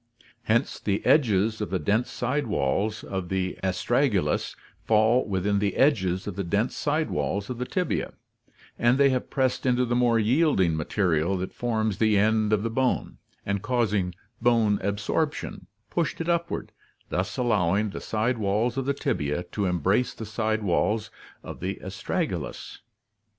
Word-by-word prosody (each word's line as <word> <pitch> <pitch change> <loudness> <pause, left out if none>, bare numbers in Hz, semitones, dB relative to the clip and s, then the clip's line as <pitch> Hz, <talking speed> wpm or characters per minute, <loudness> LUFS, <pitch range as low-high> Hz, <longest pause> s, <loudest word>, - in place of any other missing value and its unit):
Hence 115 +2 +1
the 100 -1 -1
edges 110 -6 +3
of 105 - -2
the 95 - 0
dense 105 +9 0
side 130 +2 -1
walls 105 0 0
of 95 -3 -4
the 95 -1 -2
astragalus 95 - +1 0.3
fall 110 +3 +3
within 100 +1 +1
the 100 0 0
edges 95 -10 +2
of 105 - -5
the 100 - -2
dense 100 +7 0
side 155 +2 0
walls 100 +4 -2
of 120 - -5
the 125 - -3
tibia, 180 -3 -1 0.7
and 120 +2 +4
they 140 -1 +5
have 130 -1 -2
pressed 130 -2 0
into 125 -1 +2
the 120 - -1
more 120 -1 +3
yielding 115 - +3
material 85 +2 0
that 95 +1 -4
forms 110 -4 -1
the 110 -2 +3
end 110 +1 +2
of 105 -1 +2
the 115 - -2
bone, 130 +2 -1 0.3
and 100 -1 -1
causing 105 -7 0 0.3
bone 115 -4 +3
absorption, 105 +10 -2 0.2
pushed 170 -2 -1
it 165 - -3
upward, 170 0 -1 0.4
thus - - -2
allowing 105 -3 +1
the - - -6
side 115 +3 -1
walls 110 +5 0
of 135 - -1
the 140 - +1
tibia 75 - -1
to 100 -2 -1
embrace 95 - +1
the 110 - -6
side 110 0 -1
walls 105 +3 0 0.3
of - - -8
the - - -3
astragalus. - - -4
110 Hz, 160 wpm, -26 LUFS, 100-125 Hz, 0.7 s, they